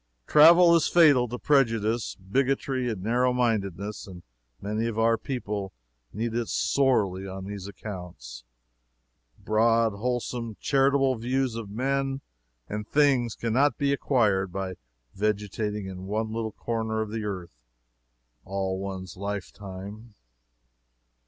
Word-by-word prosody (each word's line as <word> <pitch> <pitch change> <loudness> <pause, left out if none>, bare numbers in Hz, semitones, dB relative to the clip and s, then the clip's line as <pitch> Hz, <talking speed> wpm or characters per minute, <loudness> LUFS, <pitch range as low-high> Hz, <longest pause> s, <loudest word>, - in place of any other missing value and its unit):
Travel 170 - +7
is 165 - +3
fatal 145 -8 +5
to 120 +2 -5
prejudice, 115 -5 +1
bigotry 130 +5 -1
and 100 -5 -4
narrow 125 +4 +2
mindedness, 105 -5 -1
and 90 -3 -11 0.4
many 105 +3 -2
of 115 -2 -4
our 115 0 +4
people 105 -5 -4 0.4
need 110 +2 -3
it 120 -1 -1
sorely 100 -9 +1
on 95 0 -7
these 100 -1 -6
accounts. 90 - -9 0.9
Broad, 115 +1 +2
wholesome, 120 +1 -3
charitable 135 -1 +2
views 130 +1 0
of 115 -3 -6
men 135 +4 -1 0.5
and 105 0 -5
things 135 -6 +2
can 115 -1 -2
not 135 0 +3
be 140 0 +1
acquired 105 -9 +1
by 95 0 -3 0.4
vegetating 105 0 -2
in 95 0 -7
one 110 +2 -2
little 110 -1 -2
corner 110 -1 -2
of 110 -1 -4
the 110 -1 -3
earth 90 -11 -6 0.8
all 95 -1 -2
one's 95 0 -6
lifetime. 100 +2 -7
110 Hz, 125 wpm, -27 LUFS, 100-125 Hz, 0.9 s, Travel